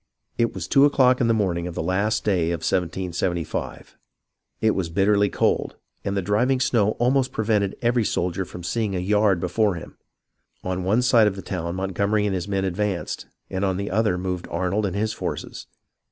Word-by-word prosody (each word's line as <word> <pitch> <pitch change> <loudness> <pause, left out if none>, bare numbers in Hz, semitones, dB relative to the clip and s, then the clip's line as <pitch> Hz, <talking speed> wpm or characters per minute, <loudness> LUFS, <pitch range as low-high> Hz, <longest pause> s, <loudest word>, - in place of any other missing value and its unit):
It 115 0 +1
was - - -4
two 135 - +5
o'clock 130 -3 +4
in 120 - +3
the 115 - +3
morning 90 -5 0
of 85 - -7
the - - -2
last 100 +4 0
day 90 -5 +2
of 85 -2 -2
1775. 90 -1 -2 0.6
It 110 - +3
was 95 -5 -2
bitterly 100 +3 +3
cold, - - 0 0.3
and 100 0 -2
the 95 - 0
driving 120 +7 +2
snow 110 -4 +2
almost 130 +2 +2
prevented 105 -3 0
every 120 0 +2
soldier 90 -2 -1
from 90 -1 -10
seeing 105 +2 -1
a - - 0
yard 100 0 +2
before 95 +3 +1
him. 85 - -10 0.6
On 90 0 -2
one 110 +7 +2
side 120 -4 +5
of 100 - -1
the 95 - -8
town 85 -2 -4
Montgomery 100 +3 0
and 100 - 0
his 90 0 -3
men 95 -1 -1
advanced, 95 0 -2 0.2
and 95 +1 -2
on 95 -2 +1
the 100 0 -3
other 105 -2 +1
moved 90 -1 -3
Arnold 95 +4 0
and 95 - -4
his 110 +1 0
forces. - - -5
100 Hz, 190 wpm, -23 LUFS, 90-110 Hz, 0.6 s, two